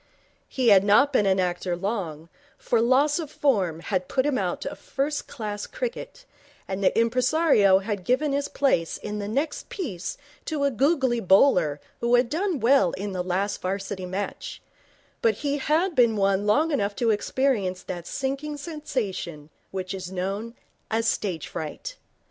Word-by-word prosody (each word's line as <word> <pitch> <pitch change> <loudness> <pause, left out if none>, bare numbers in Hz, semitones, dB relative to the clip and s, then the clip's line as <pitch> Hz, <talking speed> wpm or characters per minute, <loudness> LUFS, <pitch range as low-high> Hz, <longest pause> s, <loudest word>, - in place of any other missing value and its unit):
He 255 -3 +2
had 195 -2 +7
not 215 +8 +4
been 210 -6 +3
an 190 0 +3
actor 180 0 -1
long, 175 -6 -3 0.3
for 235 -2 +1
loss 275 +6 +3
of 315 -4 -5
form 195 - 0
had 185 -1 -2
put 260 0 0
him 295 -2 +1
out - - -2
of - - -5
first 285 +2 -2
class 210 -3 -5
cricket, - - -6 0.4
and 195 +1 -3
the - - +3
impresario 230 - +4
had 200 -1 -3
given 265 +7 +1
his 280 0 0
place 220 -12 +1
in 210 0 -5
the 205 - -4
next 275 +9 -2
piece 210 - -5 0.3
to 300 -2 -2
a 280 - +2
googly 265 -1 +2
bowler 180 - +4 0.2
who 235 +1 +3
had 245 -1 +3
done 350 -1 0
well 230 -7 +4
in 200 +1 -4
the 180 -1 -2
last 190 +3 -1
Varsity 190 0 -3
match; 195 +3 -5 0.6
but 225 -2 +3
he 285 +5 -2
had 325 +7 +1
been 235 -6 +4
one 195 0 +1
long 305 +10 +3
enough 205 -8 0
to 230 -2 +2
experience 210 -4 0
that 175 -2 -6
sinking 275 +2 -3
sensation 215 - -4 0.2
which 185 -1 -4
is 185 -1 -6
known 195 +5 -3 0.3
as 225 +1 0
stage 180 -9 -1
fright. - - -6
220 Hz, 165 wpm, -25 LUFS, 190-280 Hz, 0.6 s, had